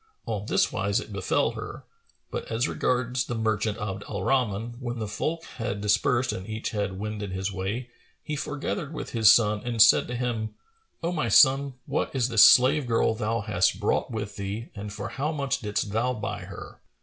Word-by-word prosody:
On 105 -3 -4
this - - +2
wise 100 +1 0
it 105 - -8
befel 95 -3 +1
her; - - -8 0.5
but - - -4
as 115 +2 -1
regards 125 0 0
the 120 - -4
merchant 110 -1 0
Abd 100 -1 -4
al 100 -3 -3
Rahman, 120 -2 0
when 120 -2 -4
the 110 -2 -3
folk 155 +11 -3
had 110 -4 -5
dispersed 105 +5 +2
and 95 +3 -7
each 110 0 -3
had 100 -3 -2
wended 105 -1 -4
his 95 +2 -2
way, 105 +6 -4 0.3
he 150 - -3
foregathered 150 +2 -4
with - - -6
his 110 -3 +6
son 105 -2 +3
and 120 -2 -3
said 110 +1 +7
to 125 - -4
him, 120 -3 -2 0.5
"O 170 - 0
my 160 -4 -1
son, 135 -1 +5
what - - -2
is 125 -2 +1
this 115 -3 +7
slave 130 +2 +6
girl 115 -1 +2
thou 110 0 -1
hast 100 - +1
brought - - 0
with 105 -3 -5
thee 100 +4 -5
and 105 0 -7
for - - -5
how 145 +3 -2
much 140 -3 -1
didst 105 -3 -2
thou 120 +4 +1
buy 100 -3 -5
her?" - - -10
110 Hz, 195 wpm, -26 LUFS, 105-125 Hz, 0.5 s, said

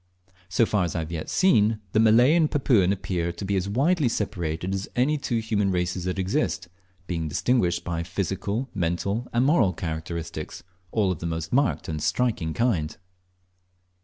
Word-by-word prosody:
So 105 +6 +3
far 105 -3 +1
as 85 - -3
I - - 0
have 80 +1 -6
yet 80 -2 -4
seen, 115 - +3
the 110 - +2
Malay 115 +6 +6
and 165 -3 +3
Papuan 120 -10 +3
appear 90 -3 -2
to 100 - -6
be 100 +1 0
as 95 +1 -1
widely 140 - +2
separated 90 -4 -2
as 95 +1 -3
any 130 +5 +2
two 135 -5 -1
human 110 -3 0
races 90 0 -1
that 90 +1 -2
exist, 95 -1 -1 0.4
being 85 -3 -2
distinguished 90 - +1
by 85 -2 -2
physical, 100 +7 -2
mental, 100 +6 -1
and 120 +2 +2
moral 125 - +3
characteristics, 80 0 -5 0.3
all 105 -4 +2
of 85 - -4
the 85 - -3
most 80 -1 -4
marked 140 +2 +1
and 75 -2 -3
striking 105 -7 0
kind. 95 -11 0
100 Hz, 170 wpm, -25 LUFS, 85-120 Hz, 0.4 s, Malay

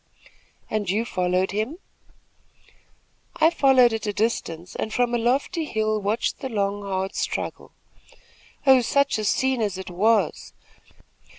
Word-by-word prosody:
"And 210 -3 -2
you 215 +5 0
followed 180 -2 0
him?" 220 - -2 1.6
"I 320 +1 +4
followed 260 -6 +4
at 220 -1 -3
a 205 - -1
distance 185 -6 -2
and 215 - -3
from 245 +1 0
a 240 - +1
lofty 275 +8 0
hill 215 -4 -1
watched 210 +4 -1
the 265 - -5
long, 205 -2 -1
hard 190 -1 -3
struggle. - - -4 0.9
Oh, 265 -2 +7
such 280 0 +1
a - - -2
scene 260 +4 +1
as 205 -4 -1
it 190 -1 -7
was! 205 0 +1
215 Hz, 135 wpm, -24 LUFS, 200-250 Hz, 1.6 s, Oh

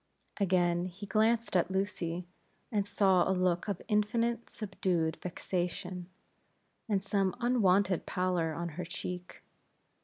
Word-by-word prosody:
Again 175 -2 +2
he 190 +3 -8
glanced 220 +2 +2
at 175 -1 +3
Lucy, 180 -3 -2 0.5
and 205 -3 0
saw 190 -3 +4
a 190 - +2
look 180 0 +1
of 200 -4 -3
infinite 230 +3 +1
subdued 185 -6 -1
vexation, 180 0 -3 0.8
and 195 -3 +1
some 195 -2 +1
unwonted 200 -7 +3
pallor 180 -3 0
on 170 0 -3
her 170 +3 -5
cheek. 180 0 -6
185 Hz, 120 wpm, -32 LUFS, 175-205 Hz, 0.8 s, saw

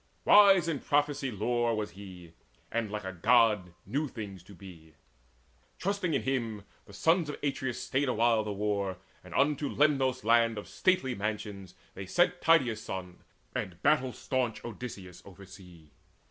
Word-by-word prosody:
Wise 195 -4 +7
in 155 -4 -1
prophecy 145 -1 0
lore 120 +2 0
Was 105 -1 -3
he, 90 -4 -12 0.4
and 115 -2 -1
like 105 0 -5
a 95 0 -5
God 105 -2 +3
knew 150 +3 -1
things 100 -7 -8
to 100 +3 -15
be. 85 -4 -14 0.8
Trusting 185 -5 -1
in - - -1
him, 115 -6 -2 0.2
the - - -13
sons 165 - +2
of 145 - -5
Atreus 135 -3 -2
stayed 135 0 0
Awhile 115 -1 +2
the 105 - -4
war, 100 -2 -2 0.3
and - - -13
unto 145 0 +1
Lemnos, 135 -4 +1
land 115 0 +3
Of 105 - -7
stately 180 -9 +1
mansions, 100 -3 -5 0.3
sent 175 - +2
they 165 +1 +6
Tydeus' 115 -6 -4
son 90 -3 -7 0.3
And 90 -2 -4
battle 135 -4 +3
staunch 125 -3 -3
Odysseus 100 -6 -8
oversea. 90 -5 -14
115 Hz, 150 wpm, -30 LUFS, 100-135 Hz, 0.8 s, Wise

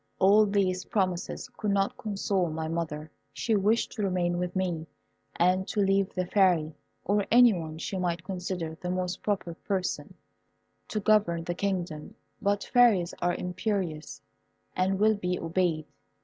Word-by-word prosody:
All 210 +3 +5
these 190 -2 0
promises 185 -4 -1
could 210 - -2
not 200 0 +1
console 195 -4 -1
my 160 0 -3
mother. 155 -2 -4 0.2
She 225 - 0
wished 210 +3 +2
to 215 - -5
remain 180 -3 0
with 180 +1 -3
me, 175 -4 -1 0.5
and 185 +2 +2
to 210 - -2
leave 195 -1 +2
the 185 - 0
Fairy, 175 -5 +3 0.3
or 205 +1 +1
any 240 -1 +7
one 160 -3 -5
she 185 +3 -4
might 170 -2 -1
consider 180 -4 -4
the 180 - -3
most 180 0 -2
proper 195 -5 -2
person, 185 +2 -3 0.7
to 215 - -2
govern 200 -5 +2
the 175 - -2
kingdom; 180 -1 -3 0.3
but 205 -1 +1
fairies 225 -9 +4
are 175 0 +1
imperious, 180 -4 -3 0.5
and 190 +1 +1
will 215 +1 +5
be 180 -2 -1
obeyed. 165 -2 0
185 Hz, 150 wpm, -28 LUFS, 170-200 Hz, 0.7 s, any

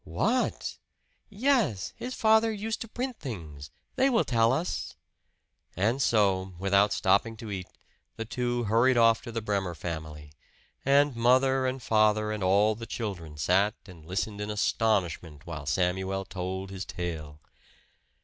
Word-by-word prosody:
"What!" 225 - -1 0.5
"Yes. 215 - +1
His 250 +1 -6
father 220 0 +4
used 215 +1 -4
to 230 - -5
print 250 +2 -4
things. 80 - -7 0.3
They 265 +1 +4
will 235 -4 +3
tell 115 -1 +3
us." 90 - -2 0.8
And 115 +8 +1
so, 95 -5 +2
without 100 +2 +3
stopping 110 +3 +2
to 110 -1 -7
eat, 95 -2 -5 0.5
the 115 - -5
two 120 +1 -1
hurried 115 +4 +3
off 115 -1 +5
to 120 - -8
the 115 -1 -4
Bremer 100 -5 -1
family; 75 -3 -7 0.5
and 140 0 +4
mother 130 +2 +3
and 130 -1 -3
father 110 -1 +3
and 105 -1 -3
all 100 +4 +4
the 115 +2 -8
children 90 -10 -5
sat 95 +7 +2
and 90 -6 -13
listened 100 +5 -3
in 105 - -3
astonishment 90 -8 0
while 80 -4 -7
Samuel 95 +3 0
told 95 +1 -5
his 95 0 -5
tale. 80 -5 -6
105 Hz, 145 wpm, -28 LUFS, 90-125 Hz, 0.8 s, off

